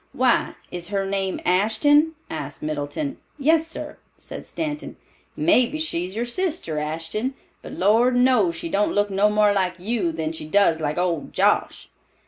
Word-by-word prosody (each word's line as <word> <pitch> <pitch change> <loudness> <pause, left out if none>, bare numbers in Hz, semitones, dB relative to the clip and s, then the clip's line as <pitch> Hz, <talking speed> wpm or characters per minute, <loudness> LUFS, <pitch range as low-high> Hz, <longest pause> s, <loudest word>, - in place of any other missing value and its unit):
"Why, 255 -1 +2 0.2
is 175 -1 -5
her 195 0 -1
name 195 -1 -2
Ashton?" 225 - +3
asked 145 -3 -6
Middleton. 155 - -3 0.2
"Yes, 320 +3 +3
sir," 325 - -7 0.2
said - - -9
Stanton. 300 -2 -4 0.4
"Mebbe 305 -2 +3
she's 185 - -3
your 235 +2 -1
sister, 270 - -2
Ashton. 165 - -3 0.3
But - - -9
Lord 225 +6 +3
knows 245 -9 +3
she 165 - -5
don't 200 +5 +1
look 205 0 +1
no 200 +2 +3
more 210 -1 +3
like 185 -2 0
you 190 -2 -1
than 160 -1 -3
she 160 -1 -7
does 170 -2 +3
like 150 +1 -1
old 175 -4 -1
Josh." - - +1
205 Hz, 155 wpm, -23 LUFS, 170-255 Hz, 0.4 s, Ashton